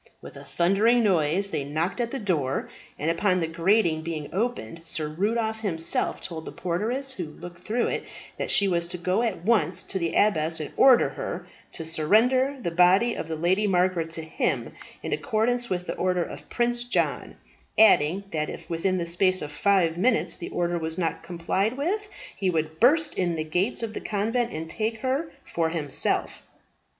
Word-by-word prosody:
With -, -, -11 dB
a -, -, -10 dB
thundering 210 Hz, +7 st, +3 dB
noise 190 Hz, 0 st, +2 dB
they 145 Hz, -, -1 dB
knocked 160 Hz, -, -2 dB
at 235 Hz, -, -1 dB
the 275 Hz, -, -4 dB
door, 160 Hz, -, -1 dB, 0.3 s
and 155 Hz, +3 st, 0 dB
upon 185 Hz, +2 st, +1 dB
the 165 Hz, -, 0 dB
grating 170 Hz, 0 st, +2 dB
being 160 Hz, -2 st, -5 dB
opened 215 Hz, -5 st, -2 dB
Sir 160 Hz, -2 st, -3 dB
Rudolph 220 Hz, +7 st, -1 dB
himself 165 Hz, -7 st, 0 dB
told 160 Hz, -3 st, -6 dB
the -, -, -6 dB
porteress 225 Hz, +10 st, -2 dB
who 180 Hz, -8 st, -4 dB
looked 175 Hz, +3 st, -11 dB
through 230 Hz, +6 st, -1 dB
it, -, -, -2 dB, 0.4 s
that -, -, -2 dB
she 200 Hz, -, +4 dB
was 170 Hz, -2 st, 0 dB
to 175 Hz, -, -5 dB
go 185 Hz, +5 st, 0 dB
at 210 Hz, -7 st, -2 dB
once 205 Hz, -5 st, +3 dB
to 190 Hz, -, -3 dB
the 170 Hz, -2 st, -2 dB
abbess 160 Hz, -6 st, +2 dB
and 155 Hz, -, -5 dB
order 260 Hz, -2 st, +6 dB
her -, -, -5 dB, 0.3 s
to 165 Hz, -, -3 dB
surrender 235 Hz, -, +2 dB
the 175 Hz, -9 st, -3 dB
body 185 Hz, +7 st, +4 dB
of 160 Hz, -, -5 dB
the 160 Hz, -, -3 dB
Lady 185 Hz, +6 st, +1 dB
Margaret 180 Hz, -3 st, +1 dB
to 160 Hz, -, -2 dB
him, 160 Hz, -, -2 dB, 0.3 s
in -, -, -2 dB
accordance 240 Hz, +2 st, 0 dB
with 180 Hz, -1 st, -2 dB
the -, -, -3 dB
order 180 Hz, -1 st, +1 dB
of -, -, -9 dB
Prince 240 Hz, 0 st, 0 dB
John; 245 Hz, -, -1 dB, 0.4 s
adding, 190 Hz, -3 st, +5 dB
that 155 Hz, -2 st, -1 dB
if -, -, -9 dB
within 185 Hz, +3 st, 0 dB
the 170 Hz, -, -2 dB
space 185 Hz, +2 st, +2 dB
of 150 Hz, -3 st, -5 dB
five 175 Hz, 0 st, +2 dB
minutes 230 Hz, +4 st, +2 dB
the -, -, -7 dB
order 175 Hz, 0 st, -1 dB
was 160 Hz, 0 st, -4 dB
not 170 Hz, -3 st, -1 dB
complied 190 Hz, +7 st, -1 dB
with, 410 Hz, +9 st, -2 dB, 0.3 s
he 190 Hz, -, 0 dB
would 160 Hz, -2 st, -2 dB
burst 300 Hz, +7 st, +4 dB
in 175 Hz, -2 st, +1 dB
the 155 Hz, -, -2 dB
gates 180 Hz, +10 st, -1 dB
of 220 Hz, -1 st, -4 dB
the -, -, -5 dB
convent 230 Hz, +4 st, -1 dB
and 160 Hz, +1 st, -5 dB
take 220 Hz, +5 st, -3 dB
her 270 Hz, +5 st, -1 dB
for 165 Hz, -1 st, -1 dB
himself. 155 Hz, -4 st, -1 dB
185 Hz, 190 wpm, -26 LUFS, 165-225 Hz, 0.4 s, order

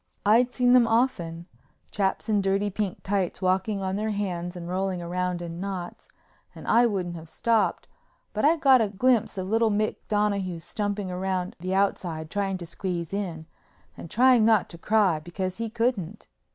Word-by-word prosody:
I'd 235 Hz, +4 st, +4 dB
seen 245 Hz, 0 st, +3 dB
them 245 Hz, -2 st, +6 dB
often—chaps 195 Hz, -2 st, -2 dB
in 210 Hz, -2 st, +2 dB
dirty 195 Hz, +1 st, 0 dB
pink 200 Hz, -1 st, -3 dB
tights 195 Hz, -3 st, -1 dB
walking 190 Hz, +2 st, 0 dB
on 190 Hz, +1 st, -1 dB
their 215 Hz, +1 st, -1 dB
hands 180 Hz, -4 st, -3 dB
and 175 Hz, -1 st, -7 dB
rolling 185 Hz, 0 st, -1 dB
round 180 Hz, 0 st, -2 dB
in 170 Hz, 0 st, -6 dB
knots—and 185 Hz, -2 st, -9 dB
I 240 Hz, +1 st, +5 dB
wouldn't 185 Hz, -5 st, -2 dB
have 165 Hz, -1 st, -10 dB
stopped 225 Hz, +2 st, 0 dB, 0.5 s
but 215 Hz, -, -2 dB
I 310 Hz, +3 st, +5 dB
got 270 Hz, -6 st, +5 dB
a 215 Hz, -, +1 dB
glimpse 230 Hz, +1 st, +1 dB
of 185 Hz, 0 st, -3 dB
little 225 Hz, +2 st, +2 dB
Mick 215 Hz, +1 st, 0 dB
Donahue 200 Hz, -4 st, 0 dB
stumping 205 Hz, +3 st, -3 dB
round 185 Hz, 0 st, -2 dB
the 185 Hz, +2 st, -2 dB
outside 170 Hz, -5 st, -1 dB
trying 195 Hz, -2 st, -1 dB
to 175 Hz, -, -8 dB
squeeze 170 Hz, 0 st, -4 dB
in 175 Hz, -6 st, -3 dB, 0.5 s
and 170 Hz, -, -9 dB
trying 250 Hz, +1 st, +5 dB
not 220 Hz, -3 st, +3 dB
to 170 Hz, -, -11 dB
cry 200 Hz, -5 st, +2 dB
because 180 Hz, +3 st, -4 dB
he 230 Hz, 0 st, -3 dB
couldn't. 220 Hz, -5 st, -2 dB
195 Hz, 165 wpm, -26 LUFS, 180-215 Hz, 0.5 s, them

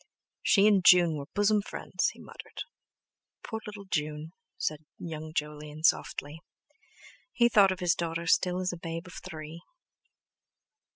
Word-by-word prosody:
"She 200 Hz, -1 st, +4 dB
and 205 Hz, -3 st, +5 dB
June 175 Hz, -2 st, +7 dB
were 140 Hz, -1 st, -6 dB
bosom 205 Hz, +1 st, +3 dB
friends!" -, -, -2 dB
he -, -, -14 dB
muttered. -, -, -9 dB, 0.8 s
"Poor 220 Hz, -2 st, -4 dB
little 210 Hz, -1 st, -8 dB
June!" 155 Hz, -2 st, -3 dB, 0.2 s
said 155 Hz, 0 st, -2 dB
young 155 Hz, -2 st, -6 dB
Jolyon 150 Hz, 0 st, -5 dB
softly. 155 Hz, -1 st, +1 dB, 0.9 s
He 235 Hz, -1 st, +4 dB
thought 200 Hz, -5 st, +5 dB
of 185 Hz, -, -4 dB
his 175 Hz, -1 st, +3 dB
daughter 170 Hz, 0 st, -3 dB
still 180 Hz, +2 st, +2 dB
as 185 Hz, -1 st, -1 dB
a -, -, -6 dB
babe 165 Hz, +1 st, -5 dB
of 180 Hz, -, -9 dB
three. 160 Hz, +1 st, -8 dB
170 Hz, 140 wpm, -29 LUFS, 155-190 Hz, 0.9 s, June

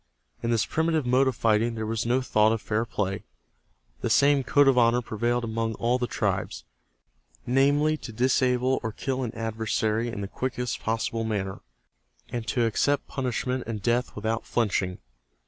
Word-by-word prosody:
In 115 Hz, -, -2 dB
this 115 Hz, -3 st, +2 dB
primitive 160 Hz, -2 st, 0 dB
mode 130 Hz, +2 st, +3 dB
of 130 Hz, -, 0 dB
fighting 115 Hz, +1 st, +2 dB
there 110 Hz, -1 st, -3 dB
was 115 Hz, +1 st, -2 dB
no 125 Hz, +2 st, +2 dB
thought 110 Hz, -3 st, +3 dB
of 115 Hz, -, -1 dB
fair 110 Hz, +2 st, -1 dB
play. 100 Hz, -3 st, -2 dB, 0.8 s
The -, -, -1 dB
same 140 Hz, -1 st, +4 dB
code 145 Hz, +2 st, +4 dB
of 135 Hz, -, +5 dB
honor 120 Hz, 0 st, +3 dB
prevailed 120 Hz, +2 st, -1 dB
among 115 Hz, 0 st, -2 dB
all 120 Hz, +2 st, +1 dB
the 125 Hz, -, -1 dB
tribes, -, -, -2 dB, 0.8 s
namely 145 Hz, +4 st, +3 dB
to 120 Hz, -, -8 dB
disable 125 Hz, +2 st, +2 dB
or 110 Hz, -2 st, -4 dB
kill 135 Hz, +2 st, -2 dB
an 120 Hz, -3 st, -2 dB
adversary 110 Hz, 0 st, -1 dB
in 115 Hz, -4 st, -4 dB
the 100 Hz, -, -3 dB
quickest 125 Hz, +2 st, -3 dB
possible 115 Hz, 0 st, -1 dB
manner, 100 Hz, -4 st, -3 dB, 0.7 s
and 120 Hz, -1 st, -4 dB
to 120 Hz, -1 st, +1 dB
accept 140 Hz, +5 st, +1 dB
punishment 125 Hz, -1 st, -2 dB
and 115 Hz, -2 st, -3 dB
death 120 Hz, +1 st, 0 dB
without 110 Hz, +2 st, -2 dB
flinching. 100 Hz, -5 st, 0 dB
120 Hz, 165 wpm, -26 LUFS, 110-130 Hz, 0.8 s, of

